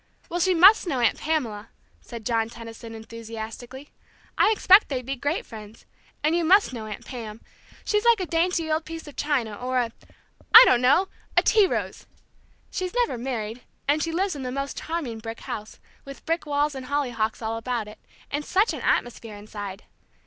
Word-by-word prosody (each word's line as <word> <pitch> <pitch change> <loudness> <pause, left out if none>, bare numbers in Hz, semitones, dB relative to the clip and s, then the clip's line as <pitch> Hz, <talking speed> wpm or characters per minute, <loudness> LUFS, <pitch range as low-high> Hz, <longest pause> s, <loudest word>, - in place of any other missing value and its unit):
"Well, 350 - -2
she 370 +1 +3
must 385 +4 +7
know 275 -6 -1
Aunt 235 -3 +2
Pamela," 235 -9 -2 0.3
said 230 -2 -10
John 225 -2 0
Tenison, 230 -1 -10
enthusiastically. 230 +4 -9 0.4
"I - - +4
expect 415 -2 +5
they'd 255 -3 -3
be 270 +2 -3
great 305 - -2
friends. 215 -1 -12 0.4
And 310 +2 +2
you 345 - +1
must 375 -2 +4
know 220 -3 -6
Aunt 210 - -8
Pam. 225 -4 -7 0.5
She's 420 0 +1
like 470 -2 +5
a 370 - -1
dainty 335 -1 0
old 310 +1 +1
piece 325 0 -8
of 295 - -11
china, 265 -8 -1
or 255 +3 -2
a 240 -2 0 0.6
I 455 - +14
don't 245 - +4
know, 285 +10 +4 0.3
a - - +6
tea 425 -3 +5
rose! - - -4 0.6
She's 370 +3 -4
never 485 - +1
married, 235 -2 -4 0.3
and 295 +2 +2
she 330 - -1
lives 370 +1 -1
in 280 - -6
the 255 -1 -4
most 275 +1 -4
charming 300 -9 -4
brick 225 +1 -7
house, 215 0 -7 0.2
with 275 0 -11
brick 330 -1 -1
walls 290 +1 +1
and 260 -1 -7
hollyhocks 240 -6 -1
all 220 +1 -2
about 230 -1 -3
it, 210 +1 -12 0.3
and 290 +1 -2
such 395 +8 +2
an - - -6
atmosphere 230 -3 -1
inside! 205 -1 -8
260 Hz, 185 wpm, -25 LUFS, 225-330 Hz, 0.6 s, I